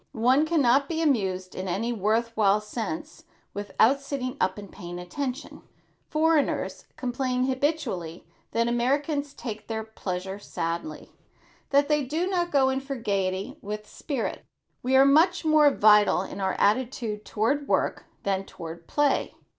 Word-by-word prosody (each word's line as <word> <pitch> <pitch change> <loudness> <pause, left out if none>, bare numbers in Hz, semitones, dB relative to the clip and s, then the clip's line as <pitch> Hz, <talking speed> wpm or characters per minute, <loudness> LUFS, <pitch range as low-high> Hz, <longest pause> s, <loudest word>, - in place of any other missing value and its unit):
One 255 +7 +3
can 320 -3 +2
not 270 +3 +4
be 325 -1 -1
amused 190 - 0
in 185 +1 -5
any 225 +7 -1
worth 225 +2 0
while 205 -1 +4
sense 245 +9 -6 0.3
without 220 +6 +2
sitting 275 -2 -4
up 185 +1 +1
and 200 -2 -9
paying 175 -3 -8
attention. 255 - -5 0.5
Foreigners 310 -1 +1
complain 255 0 -1
habitually 260 - -2 0.2
that 230 0 +1
Americans 280 +4 0
take 220 -3 -6
their 220 -1 -3
pleasure 190 -3 -5
sadly, 170 - -4 0.6
that 285 0 +4
they 300 -1 +2
do 310 +7 -1
not 360 -2 0
go 270 -3 +3
in 265 0 0
for 275 +1 -5
gaiety 200 +3 -2
with 210 +1 -6
spirit. 275 -7 -4 0.4
We 260 +2 +1
are 270 +1 +7
much 325 +5 +4
more 310 -2 +6
vital 210 -6 +5
in 195 - -7
our 190 -1 +1
attitude 220 -1 0
toward 275 +9 0
work - - 0 0.2
than 195 -1 -1
toward 165 -1 -9
play. 290 -2 +1
240 Hz, 145 wpm, -26 LUFS, 205-285 Hz, 0.6 s, are